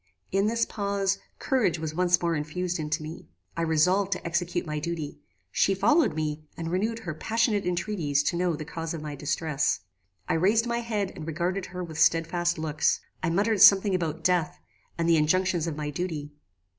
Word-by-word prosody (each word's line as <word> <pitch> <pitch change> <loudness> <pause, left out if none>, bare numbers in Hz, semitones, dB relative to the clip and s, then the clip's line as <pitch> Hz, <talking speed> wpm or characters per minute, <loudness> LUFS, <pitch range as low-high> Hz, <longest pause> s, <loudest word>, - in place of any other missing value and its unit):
In 195 +2 +2
this 230 +1 +1
pause, 200 -1 -1 0.2
courage 220 - +1
was 160 -1 -4
once 180 +1 +3
more 170 -1 +2
infused 175 +4 -2
into 155 +1 -2
me. 155 +2 -8 0.3
I 170 - -2
resolved 180 +5 +2
to - - -7
execute 170 +1 -1
my 150 -1 -3
duty. 160 -2 -4 0.3
She 195 - +2
followed 235 - +3
me, 155 -1 -2
and 165 0 -4
renewed 215 +5 0
her 170 -7 -4
passionate 220 +3 0
entreaties 175 -6 0
to 170 - 0
know 175 -1 +1
the 155 - -6
cause 165 +1 -4
of 155 - -6
my 150 -1 -5
distress. 150 0 -1 0.5
"I - - +1
raised 205 +8 +3
my 235 0 -1
head 215 -5 -2
and 160 -3 -7
regarded 175 +4 -2
her 180 0 -6
with 160 -2 -7
stedfast 170 +2 +2
looks. 155 -1 +1 0.2
I 180 - 0
muttered 200 +4 +1
something 195 0 +7
about 165 -3 -2
death, 175 -3 +1 0.4
and 165 0 0
the 165 -1 +5
injunctions 175 +2 +2
of 155 -2 -3
my 150 -1 -3
duty. 150 -3 -4
170 Hz, 185 wpm, -27 LUFS, 155-195 Hz, 0.5 s, something